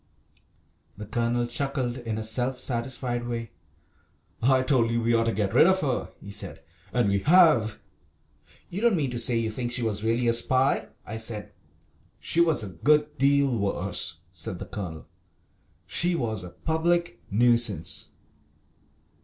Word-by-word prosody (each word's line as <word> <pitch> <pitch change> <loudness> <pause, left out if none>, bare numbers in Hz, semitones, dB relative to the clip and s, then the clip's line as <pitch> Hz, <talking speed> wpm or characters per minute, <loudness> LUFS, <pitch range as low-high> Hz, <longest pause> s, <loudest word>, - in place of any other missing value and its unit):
The 105 - -7
Colonel 120 +2 0
chuckled 130 0 -2
in 115 -3 -4
a 110 - -3
self 125 +4 -1
satisfied 120 0 -3
way. 115 -2 -4 0.9
"I 130 +2 +4
told 130 -4 +2
you 115 0 +1
we 115 0 +1
ought 115 0 +3
to 115 - +2
get 100 -2 -1
rid - - +7
of 190 0 +3
her," 130 -4 -1
he 100 - -10
said, 100 - -5 0.3
"and 120 -4 +2
we 100 0 +2
have." 150 - +5 0.9
"You 195 - -4
don't 235 -3 +4
mean 140 -6 0
to 120 - -2
say 120 0 +2
you 115 -1 0
think 120 +2 -3
she 120 0 -1
was 105 -2 -1
really 115 +2 +1
a 115 - +4
spy?" 130 +3 +2 0.2
I 110 - -5
said. 105 -2 -4 0.7
"She 170 - +1
was 160 -8 +2
a 100 - -5
good 150 - +1
deal 140 -1 +3
worse," 100 -4 -2
said 90 +1 -6
the - - -6
Colonel; 85 -6 -6 0.8
"she 170 - 0
was 110 - -2
a 90 - -7
public 165 - 0
nuisance." 120 -1 +1
120 Hz, 160 wpm, -26 LUFS, 110-135 Hz, 0.9 s, rid